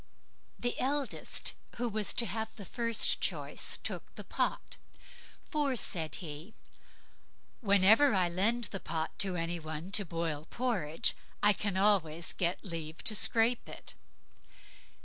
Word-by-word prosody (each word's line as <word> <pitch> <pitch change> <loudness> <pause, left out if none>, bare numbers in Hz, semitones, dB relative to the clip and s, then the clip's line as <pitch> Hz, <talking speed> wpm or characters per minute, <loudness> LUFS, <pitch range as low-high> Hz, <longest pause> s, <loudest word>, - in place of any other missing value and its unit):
The 245 0 -1
eldest, 280 +1 -1 0.2
who 240 +1 -1
was 215 -2 +1
to 235 - +1
have 220 -1 -2
first 230 +2 0
choice, - - -2
he - - -7
took - - -4
the - - -7
pot; - - -2 0.7
"for", 290 -3 +1
said 165 -8 -2
he, 160 +4 -7 1.0
"whenever 210 +5 +6
I 185 -2 +3
lend 205 +8 +2
the 195 - -4
pot 160 -2 -2
to 190 -2 +1
any 170 0 -2
one 160 +3 -6
to 200 - +3
boil 165 -3 -3
porridge, 195 -11 +1 0.3
I 210 0 +7
can 200 -1 -2
always 175 -5 +3
get 175 +2 -1
leave 165 -3 -5
to 220 - 0
scrape 230 +3 +3
it". - - -8
195 Hz, 135 wpm, -32 LUFS, 165-230 Hz, 1.0 s, I